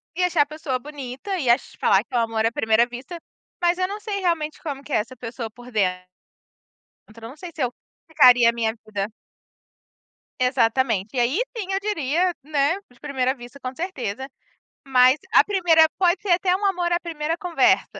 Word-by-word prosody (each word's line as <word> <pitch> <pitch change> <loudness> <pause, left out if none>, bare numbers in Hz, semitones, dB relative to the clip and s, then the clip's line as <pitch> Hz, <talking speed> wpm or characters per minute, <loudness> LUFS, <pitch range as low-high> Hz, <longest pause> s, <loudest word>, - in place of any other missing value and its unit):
e 360 - 0
achar 345 -4 +3
a - - +4
pessoa 295 -4 -4
bonita 285 +6 -6
e 255 -5 -1
acho 245 +2 +1
falar 195 +2 +3
que 240 - -24
é - - +2
o 235 - +3
amor 225 -1 0
à 230 - +2
primeira 225 0 +3
vista, 255 +9 -8 0.4
mas 350 0 +2
eu 370 0 0
não 410 +2 -6
sei 415 -1 -4
realmente 335 -5 -1
como 280 -4 -5
que 295 - -13
é - - +3
essa 230 +5 -4
pessoa 230 -1 -6
por 245 +3 -14
dentro. 180 -4 0 1.1
Então 230 +1 -15
eu - - -6
não 275 - -13
sei 345 +3 -9
se 295 - -3
eu 245 - 0 0.3
ficaria 250 -6 +6
a - - +4
minha 225 -1 -1
vida 205 -1 -3 1.3
Exatamente, 245 -3 +1
e - - +2
aí 255 - +1 0.2
sim 390 -4 -4
eu 390 - 0
diria, 355 -3 0
né, 295 +3 +1
de 245 - -23
primeira 265 -3 -1
vista 245 +1 -12
com 255 0 -6
certeza, 265 - -4 0.6
mas 255 +1 +5
a - - +8
primeira 345 -5 +4
pode 360 -1 +2
ser 405 - -3
até 360 +1 +3
um 405 - -5
amor 355 -3 +1
à 345 - +2
primeira 325 -2 -3
conversa, 355 -3 +2
275 Hz, 200 wpm, -23 LUFS, 240-345 Hz, 1.3 s, a